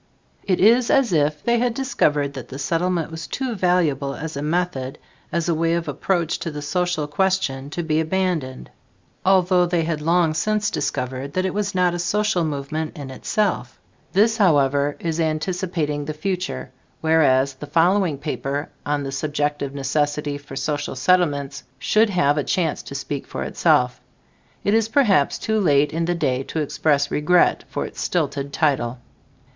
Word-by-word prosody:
It 185 -2 +1
is 230 +4 +5
as 265 -8 +3
if 150 -1 +1
they 235 0 +2
had 240 -1 0
discovered 145 - +1
that - - -7
the 135 - -8
Settlement 165 +3 -1
was 160 -2 -6
too 260 -3 -3
valuable 165 -8 +1
as 160 +1 -6
a 140 - -3
method 150 -5 -2 0.3
as 170 -1 -1
a 170 - +2
way 165 +1 +1
of 170 -1 -2
approach 170 +4 -1
to - - -3
the 150 -1 -6
social 175 -1 0
question 145 -4 0
to 155 0 -1
abandoned, 160 -6 -2 0.5
although 185 -1 +4
they 170 -1 +1
had 160 -2 -2
long 165 0 +2
since 210 +6 0
discovered 135 0 -3
it 185 0 0
was 205 -1 -2
not 180 -1 +3
a 175 - -3
"social 210 0 +1
movement" 155 +2 -3
in 140 -2 -7
itself. 160 - -2 0.3
This, 225 +3 +3
however, 145 - +3
is 165 -1 -2
anticipating 160 -2 -1
the 155 +1 -4
future, 180 - -3 0.3
whereas 140 -4 +3
the 140 +3 -9
following 175 -1 +2
paper 140 +1 -3
on 145 0 -1
"The 135 - -4
Subjective 145 0 -2
Necessity 145 +1 -1
for 140 -1 -11
Social 145 0 -2
Settlements" 145 -2 +1 0.2
should 215 +1 +3
have 150 -6 +2
a - - 0
chance 165 -1 0
to 140 - -9
speak 140 0 -4
for - - -4
itself. - - +2 0.6
It 200 - +2
is 225 0 +2
perhaps 210 - +3
too 220 0 0
late 150 -6 +3
in 165 +1 0
the 175 +1 0
day 135 -6 0
to 160 - -4
express 145 -1 +1
regret 170 +4 +3
for - - -3
its - - -8
stilted 140 0 -1
title. 135 -6 0
160 Hz, 165 wpm, -22 LUFS, 145-180 Hz, 0.6 s, is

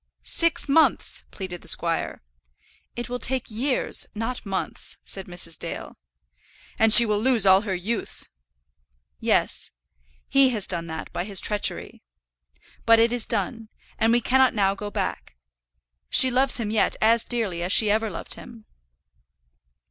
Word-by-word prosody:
"Six 335 -2 -1
months," 315 +3 +1
pleaded 180 -3 -8
the - - -11
squire. 165 - -1 0.7
"It 240 0 -6
will 245 0 -5
take 260 -2 -2
years, 255 +5 -2
not 225 +1 -6
months," 190 -1 -3
said 195 -1 -5
Mrs. 175 -2 -3
Dale. - - -6 0.8
"And 225 0 +4
she 235 - +12
will 210 -2 -1
lose 240 -2 +2
all 190 0 +5
her 200 -3 -4
youth." 205 +6 -6 0.9
"Yes; - - -1 0.6
he 275 -1 +3
has 215 -6 -3
done 170 -2 -5
all 160 - -6
that 150 - -10
by 175 - -3
his 195 0 +2
treachery. 210 -1 -3 0.8
But 230 0 +4
it 230 +1 +2
is 245 -2 -4
done, 225 -3 -3 0.3
and 225 +1 +2
we 240 +1 +2
cannot 260 +1 +2
now 195 -2 +1
go 205 +1 -8
back. 135 - -5 0.7
She 260 - +7
loves 260 +2 +2
him 220 -3 -4
yet 220 - 0
as 225 +1 +2
dearly 215 -8 -2
as 180 +2 -3
she 210 0 +5
ever 220 +1 -1
loved 175 - -7
him." 230 -2 -12
220 Hz, 155 wpm, -23 LUFS, 195-240 Hz, 0.9 s, she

